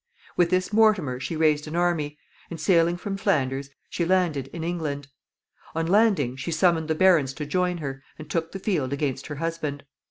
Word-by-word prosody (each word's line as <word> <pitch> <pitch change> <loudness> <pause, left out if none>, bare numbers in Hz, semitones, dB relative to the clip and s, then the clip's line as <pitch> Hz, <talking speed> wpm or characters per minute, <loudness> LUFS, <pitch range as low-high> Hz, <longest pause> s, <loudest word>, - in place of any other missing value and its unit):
With 175 -1 +3
this 185 +3 0
Mortimer 205 - +3
she 160 - -4
raised 155 -1 +2
an 155 - -5
army, 165 -4 0 0.3
and, 170 - -7
sailing 170 +1 +3
from 195 +2 -4
Flanders, 140 -8 0 0.2
she 175 - -2
landed 170 -6 +1
in 160 +4 -7
England. 150 -5 -3 0.7
On 165 0 0
landing, 190 - +3
she 140 +5 -4
summoned 165 -1 +2
the 160 - 0
barons 160 -7 +4
to 150 +2 -5
join 180 +3 0
her, 135 -4 -5 0.2
and 155 - -9
took 165 +1 -2
the - - -5
field 165 -10 -1
against 140 -2 -2
her 150 - -5
husband. 155 -2 -3
160 Hz, 185 wpm, -25 LUFS, 145-180 Hz, 0.7 s, barons